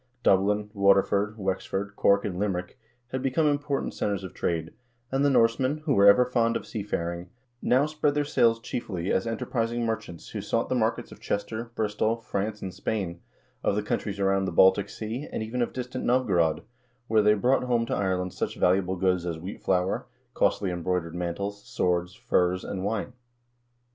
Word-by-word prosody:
Dublin, 105 +2 +2
Waterford, 100 +1 +3
Wexford, 95 0 -3
Cork, 100 0 +3
and 90 -2 -3
Limerick 90 -3 -2 0.3
had 130 - -2
become 135 +5 +1
important 145 -1 0
centers 100 -2 -2
of 95 - -7
trade, 80 -1 -2 0.4
and 135 +1 +1
the 145 - +4
Norsemen, 130 +4 +2
who 145 - +2
were 100 -4 +6
ever 115 +5 +7
fond 115 -2 +1
of - - -9
seafaring, 85 -5 -4 0.3
now 130 +3 +3
spread 150 -1 0
their 145 0 +1
sails 115 -5 +3
chiefly 100 -6 -4
as 95 - +1
enterprising 115 +1 -1
merchants 110 -7 -4
who - - -5
sought - - -1
the - - +1
markets - - 0
of - - -12
Chester, 110 +3 -3
Bristol, 110 +1 0
France, 105 -1 -3
and 95 -1 -5
Spain, 95 -3 -3 0.4
of - - +2
the 105 - 0
countries 100 -1 -2
around 95 0 +2
the - - -2
Baltic 95 +3 +5
Sea, 115 +7 -5
and - - -3
even 120 +3 -3
of 120 - 0
distant 125 0 -5
Novgorod, 90 -11 +2 0.4
whence 110 -1 +3
they 105 0 +5
brought 125 +5 +2
home 120 -2 +1
to - - -3
Ireland 95 -2 -1
such - - -3
valuable 95 0 +2
goods 90 -1 +1
as 85 -2 -2
wheat 90 +5 -8
flour, 90 0 0 0.3
costly 95 -3 +1
embroidered 90 -1 -2
mantles, 100 +4 -4
swords, 90 +1 -1
furs, 90 -1 +1
and 95 -2 -4
wine. 105 +3 -2
100 Hz, 175 wpm, -27 LUFS, 95-115 Hz, 0.4 s, ever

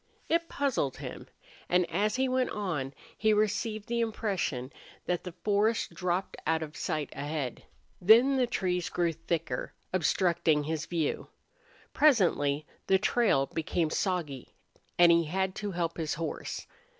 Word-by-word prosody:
It 335 0 +1
puzzled 265 - -1
him. - - -7 0.4
And 180 -1 +3
as 205 +6 +1
he 260 +1 +1
went 255 0 +1
on 155 -10 -3 0.2
he 215 0 +3
received 215 +1 0
the 235 0 -1
impression 195 - -2 0.3
that 175 -1 -1
the 180 - -6
forest 210 +2 +1
dropped 180 +1 -2
out 160 0 +2
of 150 -1 -8
sight 150 -2 -2
ahead. 145 -3 -3 0.4
Then 235 +8 +6
the 255 -2 +2
trees 180 -6 -1
grew 170 -2 0
thicker, 165 -5 -3 0.2
obstructing 170 -3 +2
his 155 +1 -3
view. 165 -4 -1 0.7
Presently 170 - +3 0.2
the 190 - +5
trail 205 - +2
became 160 +2 -1
soggy 160 -10 -2 0.4
and 175 -1 +7
he 170 0 +4
had 190 +4 -1
to 205 -1 -3
help 170 -3 -2
his 155 -2 -1
horse. 165 +1 -4
180 Hz, 140 wpm, -30 LUFS, 155-210 Hz, 0.7 s, and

